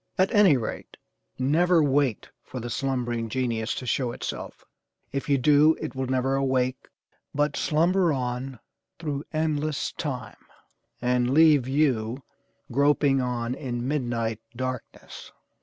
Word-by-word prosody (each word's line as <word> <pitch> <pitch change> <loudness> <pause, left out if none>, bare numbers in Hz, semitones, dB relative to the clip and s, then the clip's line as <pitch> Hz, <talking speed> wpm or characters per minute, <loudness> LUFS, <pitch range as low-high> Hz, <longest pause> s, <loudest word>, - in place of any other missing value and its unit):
At 190 +5 +2
any 200 - +6
rate, 115 - -6 0.4
never 165 +5 +3
wait 140 -5 +1
for 130 - -7
the 120 0 -5
'slumbering 120 -4 -2
genius' 115 -2 -1
to 130 - -5
show 125 -1 0
itself, - - -6 0.5
if 140 +1 -4
you 140 - +4
do, 150 +4 +5
it 155 - -5
will 130 -1 -3
never 130 +1 0
awake 130 -1 0 0.5
but 145 0 +1
slumber 170 +3 +2
on 125 -1 -3 0.4
through 150 -3 -4
endless 155 -2 -1
time, 125 -9 -6 0.6
and 125 0 +2
leave 150 -5 +6
you 130 -3 0 0.5
groping 140 0 +3
on 120 -1 -2
in 125 -2 -4
midnight 120 -6 -1 0.2
darkness. 130 0 -6
130 Hz, 125 wpm, -26 LUFS, 125-150 Hz, 0.6 s, any